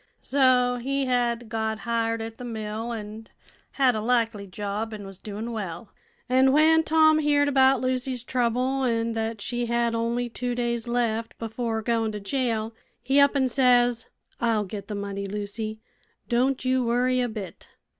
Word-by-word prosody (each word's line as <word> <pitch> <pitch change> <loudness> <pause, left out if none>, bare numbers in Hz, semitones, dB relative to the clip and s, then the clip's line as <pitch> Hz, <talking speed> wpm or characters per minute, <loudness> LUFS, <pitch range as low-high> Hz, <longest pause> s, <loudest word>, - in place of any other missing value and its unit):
So 250 -2 +3
he 275 +2 -1
had 240 -2 0
got 220 0 -2
hired 230 -1 -1
at 225 0 -8
the - - -7
mill, 220 0 -4
an' 220 0 -7 0.5
had 265 -3 +3
a 215 - -2
likely 225 -3 0
job, 210 +3 -4
an' 205 -1 -8
was 195 -1 -9
doin' 215 +3 -6
well. 195 -3 -5 0.4
An' 260 +1 +4
when 320 +2 +5
Tom 315 -1 +4
heerd 290 -1 +3
about 265 -2 +4
Lucy's 255 -1 -1
trouble, 250 +2 0
an' 230 -2 0
thet 225 -1 -3
she 240 +2 -2
had 235 0 +1
only 235 +1 -1
two 245 +1 -3
days 235 -1 -2
left 230 -2 -1
before 225 0 -3
goin' 225 -1 0
to 210 - -4
jail, 225 0 -1 0.3
he 270 +3 +3
up 280 0 +5
an' 265 -2 +3
says: 245 -2 +3 0.3
'I'll 225 -3 +1
get 200 +1 -7
the 210 - -4
money, 200 0 -4
Lucy: 210 +2 -4 0.5
don' 255 +3 +2
you 255 0 +1
worry 250 +2 +1
a 245 - 0
bit.' 210 -5 -8
235 Hz, 165 wpm, -25 LUFS, 220-255 Hz, 0.5 s, when